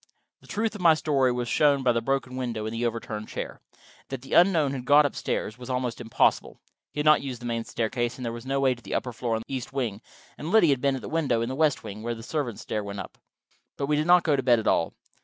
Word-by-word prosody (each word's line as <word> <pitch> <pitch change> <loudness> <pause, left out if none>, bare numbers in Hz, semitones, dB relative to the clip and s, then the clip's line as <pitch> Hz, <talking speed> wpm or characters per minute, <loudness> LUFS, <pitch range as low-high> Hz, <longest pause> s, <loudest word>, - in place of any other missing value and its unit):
The - - -20
truth 220 0 -1
of 210 - -8
my 165 -3 +6
story 140 -5 +2
was 120 0 -2
shown 140 +1 +3
by 125 - +4
the 115 0 0
broken 130 +1 -1
window 120 -4 -3
and 110 - -4
the 120 +1 0
overturned 110 -2 -5
chair. - - -6 0.5
That 135 -1 -5
the 135 - -7
unknown 170 -6 +5
had 130 -2 -4
got 145 +3 +6
up 145 - -2
stairs 110 +3 -3
was 125 - -9
almost 125 -2 -2
impossible. 115 -1 +1 0.3
He - - -14
had - - -4
not 155 0 +6
used 130 -4 -5
the 120 - -9
main 115 -1 -2
staircase, 120 +2 -2
there 120 -3 -4
was 120 0 -7
no 135 +1 -1
way 135 -1 +3
to 120 - -14
the - - -5
upper 125 - -2
floor 115 0 -2
in 110 - -3
the - - -7
east 130 0 -4
wing, 115 -6 -2 0.4
and 155 - -5
Liddy 205 -5 +5
had 135 -2 0
been 140 -1 +2
at 130 - -7
the - - -5
window, 150 -8 0
in 115 - -3
the 130 - -3
west 150 -1 +2
wing, 105 +2 -7
where 120 +1 -3
the 115 - -10
servants' 125 -5 -3
stair 105 - -3
went 100 0 -6
up. - - -9 0.6
But 140 - -1
we 150 +1 +1
did 155 +2 0
not 180 0 +6
go 150 -3 +3
to 135 - 0
bed 120 -2 +4
at 110 - -3
all. 80 - +1
130 Hz, 275 wpm, -26 LUFS, 115-145 Hz, 0.6 s, my